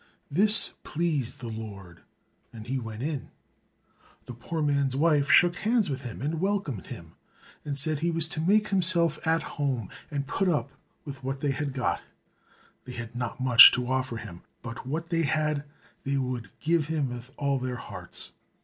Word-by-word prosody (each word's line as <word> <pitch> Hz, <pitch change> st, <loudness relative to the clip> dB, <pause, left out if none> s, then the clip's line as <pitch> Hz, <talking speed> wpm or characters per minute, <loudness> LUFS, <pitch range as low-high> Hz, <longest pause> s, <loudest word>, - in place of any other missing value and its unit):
This 210 Hz, +8 st, +7 dB
pleased 150 Hz, -8 st, -3 dB
the 120 Hz, -, -6 dB
Lord, 100 Hz, -6 st, -9 dB, 0.5 s
and 110 Hz, -2 st, -11 dB
he 130 Hz, +2 st, -3 dB
went 115 Hz, 0 st, -7 dB
in. 145 Hz, -4 st, -4 dB, 1.0 s
The 125 Hz, -, -8 dB
poor 155 Hz, +7 st, -5 dB
man's 140 Hz, -2 st, 0 dB
wife 150 Hz, -1 st, +2 dB
shook 175 Hz, +2 st, +5 dB
hands 220 Hz, -5 st, 0 dB
with 135 Hz, -1 st, -4 dB
him, 120 Hz, -1 st, -8 dB
and 155 Hz, +3 st, -3 dB
welcomed 190 Hz, -, -2 dB
him, -, -, -10 dB, 0.5 s
and 145 Hz, -2 st, -4 dB
said 150 Hz, +2 st, +6 dB
he 170 Hz, +2 st, -1 dB
was 165 Hz, -1 st, +4 dB
to 165 Hz, -3 st, -3 dB
make 210 Hz, +5 st, +2 dB
himself 170 Hz, -4 st, +3 dB
at 165 Hz, +1 st, +1 dB
home 130 Hz, -, -3 dB, 0.2 s
and 140 Hz, -1 st, -3 dB
put 195 Hz, +7 st, -1 dB
up 150 Hz, -5 st, -1 dB, 0.3 s
with 140 Hz, -2 st, -9 dB
what 135 Hz, +1 st, -4 dB
they 145 Hz, -, 0 dB
had 140 Hz, +1 st, -3 dB
got; 130 Hz, -2 st, -2 dB, 0.8 s
they 125 Hz, -, -9 dB
had 115 Hz, -1 st, -8 dB
not 120 Hz, 0 st, -5 dB
much 125 Hz, -3 st, +9 dB
to 125 Hz, -, -1 dB
offer 130 Hz, -2 st, -2 dB
him, 105 Hz, -6 st, -10 dB, 0.2 s
but 115 Hz, +1 st, -8 dB
what 165 Hz, +5 st, -4 dB
they 165 Hz, -1 st, 0 dB
had 150 Hz, 0 st, -1 dB, 0.4 s
they 140 Hz, 0 st, -1 dB
would 125 Hz, -3 st, -4 dB
give 160 Hz, -1 st, 0 dB
him 155 Hz, -4 st, -1 dB
with 120 Hz, 0 st, -8 dB
all 140 Hz, -2 st, -1 dB
their 130 Hz, 0 st, -4 dB
hearts. 125 Hz, -, -10 dB
140 Hz, 175 wpm, -26 LUFS, 125-160 Hz, 1.0 s, much